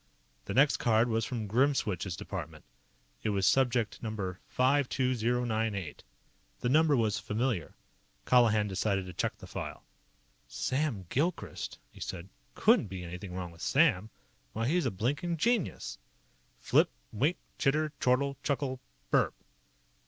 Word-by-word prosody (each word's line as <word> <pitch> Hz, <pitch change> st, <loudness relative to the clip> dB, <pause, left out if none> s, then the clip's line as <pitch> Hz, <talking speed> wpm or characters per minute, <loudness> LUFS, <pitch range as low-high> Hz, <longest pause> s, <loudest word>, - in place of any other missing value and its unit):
The -, -, -4 dB
next 140 Hz, +2 st, +5 dB
card 115 Hz, +1 st, +3 dB
was 115 Hz, -1 st, +1 dB
from 115 Hz, -3 st, -3 dB
Grimswitch's 105 Hz, -, +1 dB
department. -, -, -7 dB, 0.6 s
It 110 Hz, -, -1 dB
was 100 Hz, -2 st, +1 dB
Subject 120 Hz, -3 st, +2 dB
#52098. 115 Hz, -, 0 dB, 0.6 s
The 120 Hz, -, +1 dB
number 150 Hz, +1 st, +4 dB
was 110 Hz, -3 st, +1 dB
familiar. 110 Hz, -5 st, -2 dB, 0.5 s
Colihan 110 Hz, -4 st, +4 dB
decided 95 Hz, 0 st, 0 dB
to 90 Hz, -, -8 dB
check -, -, -2 dB
the -, -, -11 dB
file. -, -, -6 dB, 0.6 s
"Sam 100 Hz, -, -1 dB
Gilchrist," 165 Hz, +6 st, -2 dB
he -, -, -15 dB
said. 90 Hz, 0 st, -6 dB, 0.3 s
"Couldn't -, -, +4 dB
be 95 Hz, -1 st, -6 dB
anything 90 Hz, +1 st, -7 dB
wrong 90 Hz, -2 st, -4 dB
with 85 Hz, 0 st, -15 dB
Sam. 125 Hz, -, +3 dB, 0.4 s
Why, 115 Hz, +1 st, -1 dB
he's 175 Hz, +4 st, +2 dB
a -, -, +2 dB
blinkin' 145 Hz, -, -1 dB
genius!" 230 Hz, +2 st, 0 dB, 0.6 s
Flip. -, -, +3 dB, 0.2 s
Wink. 145 Hz, -, +1 dB, 0.2 s
Chitter. 155 Hz, +2 st, +2 dB
Chortle. 135 Hz, +2 st, +2 dB
Chuckle. 140 Hz, -3 st, -1 dB, 0.3 s
BURP! -, -, +4 dB
115 Hz, 125 wpm, -31 LUFS, 100-135 Hz, 0.6 s, next